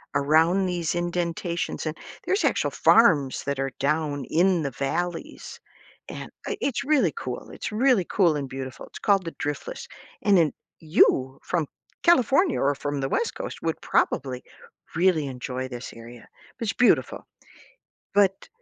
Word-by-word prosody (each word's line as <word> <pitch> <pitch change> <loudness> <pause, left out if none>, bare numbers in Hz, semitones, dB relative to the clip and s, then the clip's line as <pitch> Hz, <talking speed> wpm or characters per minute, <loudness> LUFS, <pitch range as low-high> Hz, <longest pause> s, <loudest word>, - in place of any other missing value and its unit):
around 160 +7 +3
these 175 -3 -1
indentations, 175 0 -2
and 155 0 -2 0.3
there's 390 - +1
actual - - +1
farms 155 - +4
that 140 -1 -2
are 135 0 -1
down 145 -1 0
in 175 +2 +2
the 140 - -2
valleys, 165 +7 -4 0.5
and - - -7 0.2
i 430 - -2
it's 270 -5 -1
really 270 - +2
cool 125 -1 -6
It's - - -6
really 230 -3 +3
cool 175 -6 +3
and 140 -2 -4
beautiful. 130 -1 -7
It's - - -11
called 195 -3 +2
the 165 - -5
Driftless, 145 - -5 0.4
and 200 -2 +5
then, 160 -4 +3 0.3
you, 135 -4 +3
from 165 -4 -1 0.4
California 340 - +4
or 140 +1 +3
from 145 0 -3
the 135 - -1
West 465 - -1
Coast, - - -6
would 165 -1 -2
probably 130 -2 0 0.5
really 165 -4 +2
enjoy 130 0 -5
this 125 -1 -8
area. 115 +1 -12 0.3
It's 225 -2 -1
beautiful. 245 - +2 0.9
But 195 -1 +2
165 Hz, 150 wpm, -25 LUFS, 140-195 Hz, 0.9 s, and